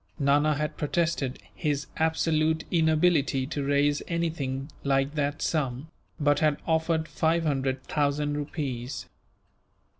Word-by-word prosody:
Nana 145 +2 +3
had 150 +1 -3
protested 150 -4 0 0.2
his 145 -4 -1
absolute 160 0 +1
inability 160 -5 +3
to 145 0 -3
raise 145 +1 +2
anything 155 -5 -2
like 135 +1 +1
that 145 0 -1
sum, 145 -1 -1 0.3
but 145 -1 +3
had 150 -2 +2
offered 160 0 +1
five 165 +1 +1
hundred 135 -3 -1
thousand 145 0 0
rupees. 140 -4 -4
150 Hz, 115 wpm, -27 LUFS, 140-160 Hz, 0.3 s, Nana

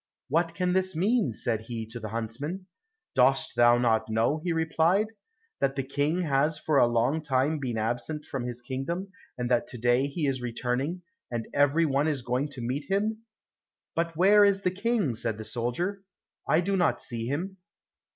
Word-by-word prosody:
"What 165 +3 +1
can 180 -1 0
this 185 -1 0
mean?" 210 +6 +2
said 115 -3 -2
he 115 0 -5
to 115 +2 -7
the 110 -1 -6
huntsman. 115 - -4 0.5
"Dost 135 +4 +3
thou 120 0 +6
not 115 -2 +2
know?" 115 +8 +1
he 180 - 0
replied, 165 +4 +2 0.5
"that 135 - +1
the 135 - -1
King 145 +6 0
has 150 +1 +1
for 150 -1 +2
a - - +6
long 120 +7 +1
time 145 +1 +1
been 125 -5 -3
absent 120 +7 -2
from 135 -3 -4
his 120 0 -6
kingdom, 135 +10 -4 0.3
and 125 -1 -2
that 120 - +2
to 125 - -8
day 120 +3 +2
he 145 +2 -2
is 135 -2 0
returning, 125 +8 -2 0.3
and 115 -2 -3
every 145 +4 +3
one 140 0 +1
is 145 -5 -1
going 125 +4 0
to 140 -4 -8
meet 130 +5 -2
him." 215 +3 0 0.7
"But 165 -1 -2
where 205 +4 +6
is 200 -1 +3
the 180 - +2
King?" 200 - 0
said 110 -1 -2
the 110 - -7
soldier, 125 - -2 0.5
"I 160 - +4
do 195 +2 0
not 175 -3 +2
see 115 -1 -4
him." 180 +8 -3
140 Hz, 185 wpm, -28 LUFS, 120-170 Hz, 0.7 s, thou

